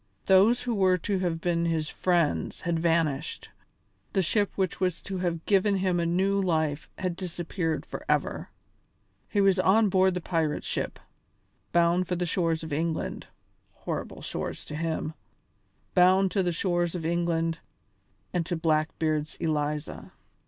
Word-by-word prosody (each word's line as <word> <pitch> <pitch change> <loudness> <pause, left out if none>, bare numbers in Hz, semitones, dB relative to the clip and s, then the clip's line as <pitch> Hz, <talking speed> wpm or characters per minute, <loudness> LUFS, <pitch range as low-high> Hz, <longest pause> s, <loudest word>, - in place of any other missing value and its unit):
Those 205 +6 +5
who 245 -1 -1
were 190 -3 +3
to 190 +2 -1
have 170 -3 -1
been 170 -1 +1
his 160 -2 0
friends 170 -4 0
had 170 -1 -1
vanished, 165 -4 0 0.6
the 190 - +2
ship 205 +4 +1
which 190 -3 -1
was 180 -3 0
to 190 -2 -4
have 170 -2 -2
given 200 0 +3
him 185 -2 +1
a 170 - +1
new 195 +3 +2
life 155 -5 0
had 185 -2 -2
disappeared 175 -2 -3
forever. - - -2 0.8
He 205 - +2
was 195 -1 +4
on 205 +3 +4
board 190 0 +3
the - - 0
pirate 165 -4 -1
ship, - - -3 0.7
bound 175 +1 +3
for 180 - -1
the 180 0 -1
shores 165 -2 0
of 160 -2 -5
England 160 +2 -2 0.5
horrible - - -5
shores - - -5
to 150 - -7
him 160 0 -2 0.8
bound 185 +1 +5
to 195 - +1
the 180 -1 +1
shores 175 0 0
of 165 -3 -4
England 165 -1 0 0.7
and 175 -2 +1
to 175 - -1
Blackbeard's 155 -1 0
Eliza! 150 -1 -3
175 Hz, 150 wpm, -27 LUFS, 165-185 Hz, 0.8 s, Those